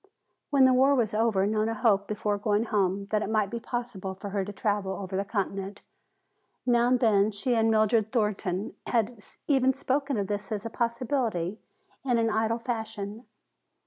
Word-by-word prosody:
When 275 -2 +5
the 260 - +5
war 270 +2 +5
was 230 -5 +1
over 215 -3 +2
Nona 215 +2 0
hoped 205 -3 +2
before 210 -1 -1
going 210 +1 +1
home 200 -3 0
that 215 -1 +2
it 210 - -3
might 215 -3 +1
be 235 - -3
possible 230 -6 -5
for 200 +1 -7
her 200 -1 0
to 200 - -6
travel 200 -1 -1
over 190 0 -5
the 195 - 0
continent. 200 -1 -3 0.8
Now 240 -1 +3
and 250 0 +3
then 210 -3 +4
she 220 +4 -1
and 225 -1 +3
Mildred 220 0 +2
Thornton 210 -4 -1
had 230 -1 0 0.3
even 265 -2 +3
spoken 275 0 -1
of 200 - 0
this 205 0 -4
as 210 -1 -3
a 230 - -4
possibility 235 -6 -1 0.4
in 250 -3 +1
an 225 -1 +2
idle 220 +1 +1
fashion. 220 -2 -5
215 Hz, 175 wpm, -28 LUFS, 200-235 Hz, 0.8 s, When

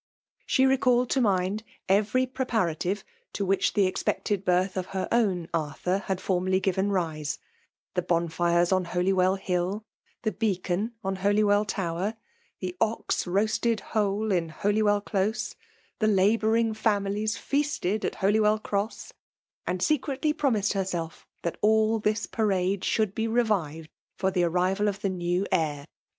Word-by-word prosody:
She 265 - +4
recalled 250 -2 +3
to 270 - +2
mind 195 -1 +1 0.3
every 210 +6 +3
preparative 215 -8 -1 0.3
to 200 - -2
which 195 +1 +1
the 205 -2 +3
expected 195 +1 -1
birth 185 +1 +1
of 185 -1 -2
her 185 - -1
own 195 -8 +1
Arthur 165 +4 -1
had 190 -2 -1
formerly 185 0 +1
given 190 +1 0
rise: 160 -5 -2
^ - - -35 0.5
the 180 - +1
bonfires 170 +1 +1
on 185 -1 +2
Holywell 185 +2 +2
Hill 190 +2 -2 0.2
— - - -39
the 220 - +1
beacon 200 0 -1
on 195 0 -2
Holywell 205 +1 +3
Tower 190 +2 -2 0.5
•^the 180 -1 -3
ox 220 -3 0
roasted 220 +4 +1
whole 210 0 +1
in 170 -3 +1
Holywell 205 +4 +1
Close 205 +2 -1 0.2
— - - -37
^the 215 0 +4
labouring 220 +3 +3
families 210 0 0
feasted 280 - -1
at - - -1
Holywell 210 +2 +3
Cross; 210 - -3 0.5
and 180 0 -1
secretly 300 0 +1
promised 230 -11 +1
herself 180 -4 -3 0.2
that 170 - -3
all 220 +1 +3
this 215 +1 0
parade 195 -3 0
should 215 -4 +1
be 225 +1 -1
revived 190 -10 0 0.2
for 190 -1 0
the 180 -2 +2
arrival 185 +4 +1
of 200 -1 -2
the 195 - 0
new 180 +1 -1
heir. 145 -3 0
200 Hz, 145 wpm, -27 LUFS, 180-220 Hz, 0.5 s, She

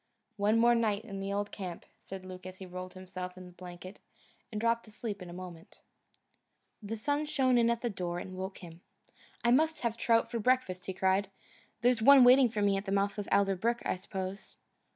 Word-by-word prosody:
"One 210 +2 +3
more 235 +1 +5
night 220 -2 0
in 200 -3 -6
the 195 0 -3
old 205 +1 -2
camp," 180 -4 -7 0.2
said 190 -1 -8
Luke 185 0 -9
as 185 0 -9
he 190 - -8
rolled 185 0 -8
himself 185 0 -7
in 185 - -9
the 180 - -12
blanket 180 +2 -10 0.5
and 215 - -3
dropped 230 +1 +1
asleep 210 -2 -6
in 180 - -8
a - - -8
moment. 175 -2 -10 1.0
The 220 +2 -5
sun 290 +6 -1
shone 265 -4 +2
in 235 -1 +4
at 235 0 0
the 240 - -1
door 175 -3 -3
and 185 +1 -6
woke 190 +1 -5
him. 170 0 -11 0.6
"I 235 - +4
must 315 +5 +3
have 235 -2 0
a - - -21
trout 230 -1 +2
for 235 - -2
breakfast," 220 -6 +1
he 190 - -2
cried, 190 +1 +1 0.5
"there's 245 -1 +3
one 275 +2 +8
waiting 250 0 +7
for 210 -2 -1
me 200 -1 +3
at 195 - -4
the 195 - -3
mouth 200 +1 0
of 205 - -5
Alder 195 -1 +3
Brook, 235 +5 -1
I - - +1
suppose." 190 +1 -6
200 Hz, 215 wpm, -31 LUFS, 185-235 Hz, 1.0 s, one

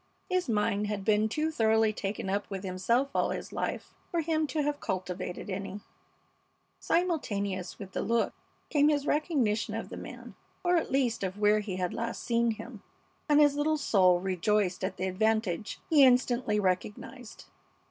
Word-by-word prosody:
His 365 -6 0
mind 210 -1 +1
had 205 -2 -3
been 215 0 +3
too 310 +7 -1
thoroughly 220 -4 +3
taken 200 -1 -4
up 200 +2 -1
with 195 -1 -5
himself 215 +9 0
all - - +2
his - - -5
life - - -3 0.2
for 340 - 0
him 315 -1 0
to 300 0 -1
have 290 0 -1
cultivated 185 -1 -4
any. 195 +1 -5 1.0
Simultaneous 205 - -1
with 195 -2 -9
the - - -2
look 235 0 +1 0.4
came 295 -1 +4
his 290 -2 +1
recognition 280 -9 0
of - - -5
the - - -7
man - - -9 0.3
or, 355 0 +3
at 330 - +1
least, 255 -4 +1
of 190 0 -3
where 210 0 +4
he 205 -3 -4
had 180 -1 -2
last 230 0 -4
seen 235 -1 +2
him, 220 - -6 0.5
and 295 0 +6
his 290 -1 +5
little 305 +2 +1
soul 185 -10 +4
rejoiced 190 +1 0
at 190 0 -2
the 185 - -2
advantage 215 0 0
he 305 -3 +5
instantly 245 -4 +3
recognized. 210 +5 -3
220 Hz, 170 wpm, -29 LUFS, 195-280 Hz, 1.0 s, and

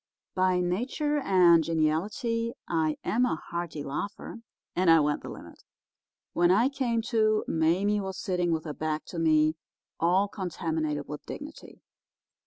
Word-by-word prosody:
By 185 -1 +2
nature 260 - -1
and 180 - +5
geniality 210 - -1
I 160 -2 0
am 240 +4 +1
a 250 - +1
hearty 170 -2 -5
laugher, 200 +10 -5 0.4
and 185 -1 +2
I 165 0 +7
went 150 0 0
the - - -8
limit. - - -11 0.7
When 175 0 +3
I 220 +8 +4
came 245 -5 -1
to, 215 -2 +2
Mame 185 +6 +1
was 190 -1 -5
sitting 180 -3 -1
with 160 0 -1
her 150 - -4
back 155 0 -3
to 170 - -5
me, 155 -1 +3 0.4
all 185 +4 +3
contaminated 160 -6 -3
with 150 0 -7
dignity. 300 +2 -9
180 Hz, 145 wpm, -28 LUFS, 160-215 Hz, 0.7 s, I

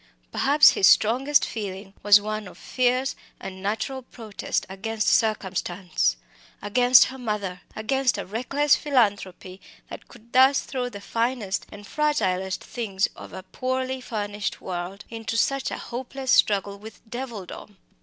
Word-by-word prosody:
Perhaps 295 +2 +6
his 190 - +4
strongest 260 +9 +4
feeling 195 -2 -6
was 205 0 +7
one 215 0 -4
of 180 - -13
fierce 255 +1 0 0.2
and 190 -1 -8
natural 220 +7 -3
protest 225 -4 -4
against 215 +3 -3
circumstance 185 - 0 0.4
against 245 +4 +5
her 265 +1 -8
mother! 205 -6 -3
against 255 +3 0
a 200 - -4
reckless 270 +8 +1
philanthropy 200 - -1 0.3
that - - -9
could 235 -1 -18
thus 265 +2 +5
throw 250 -2 -4
the 200 -4 -9
finest 230 -2 -2
and 205 0 -11
fragilest 190 -11 -1
things 200 -5 -2
of - - -11
a 185 - -8
poorly 260 +5 -3
furnished 205 -4 -4
world 185 +2 -6
into 225 0 -4
such 275 +3 +1
a - - -5
hopeless 260 +2 -5
struggle 200 -1 +3
with 220 +2 -13
devildom. 220 -4 -7
220 Hz, 135 wpm, -25 LUFS, 195-255 Hz, 0.4 s, was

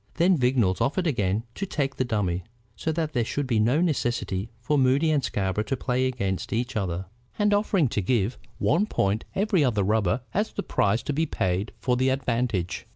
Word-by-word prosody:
Then 180 +2 +4
Vignolles 125 - +2
offered 175 +6 +1
again 105 - 0
to 195 - -4
take 140 -5 -2
the - - +2
dummy, 100 -7 -1 0.3
so 160 - -2
that 160 -1 -2
there 120 -4 +2
should 140 +5 -2
be 120 -4 +1
no 125 +9 +3
necessity 120 - -1
for 120 +6 0
Moody 140 +4 +3
and 145 -3 +2
Scarborough 95 +1 -1
to 135 - -2
play 125 +1 0
against 100 -7 -2
each 120 +3 -1
other, 95 -3 -2 0.3
and 205 -1 +3
offered 195 - +2
to 105 - 0
give 110 +2 0 0.2
one 180 +9 +2
point 100 - 0
every 195 -5 +2
other 110 -7 +2
rubber 105 +2 +1
as 210 +3 0
the 200 - -3
price 100 +3 +1
to 145 - -2
be 160 +3 0
paid 95 -3 -1
for 125 -1 0
the 130 +1 +2
advantage. 120 -8 -1
125 Hz, 195 wpm, -26 LUFS, 105-150 Hz, 0.3 s, Then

